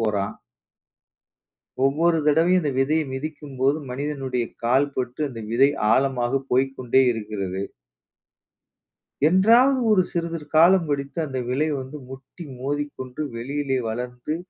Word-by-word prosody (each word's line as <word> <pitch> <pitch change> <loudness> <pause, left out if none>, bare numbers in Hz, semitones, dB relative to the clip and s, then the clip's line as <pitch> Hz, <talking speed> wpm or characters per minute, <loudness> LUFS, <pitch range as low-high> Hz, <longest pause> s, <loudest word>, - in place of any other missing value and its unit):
போறான். 105 -2 -1 1.5
ஒவ்வொரு 165 +5 +2
தடவையும் 165 +5 +4
அந்த 150 -3 -1
விதையை 155 +4 +1
மிதிக்கும் 145 0 -6
போது 135 +3 +2
மனிதனுடைய 135 -2 -3 0.2
கால் 130 +4 +3
பட்டு 125 +3 -3
அந்த 115 -3 -8
விதை 135 +4 +5 0.2
ஆழமாக 130 0 +1
போய்க்கொண்டே 130 0 +2
இருக்கிறது. 100 -4 -4 1.7
என்றாவது 235 +9 +5
ஒரு 200 -3 +5
சிறிதுரு 165 -2 -3
காலம் 170 +1 +5
கழித்து 140 +2 -2
அந்த 130 -3 -4
விதை 140 +5 +1
வந்து, 130 +3 -8
முட்டி 135 +6 -11 0.2
மோதிக்கொண்டு 140 -1 -4
வெளியிலே 135 +3 -2
வளர்ந்து, 125 +5 -4
135 Hz, 110 wpm, -23 LUFS, 125-155 Hz, 1.7 s, விதை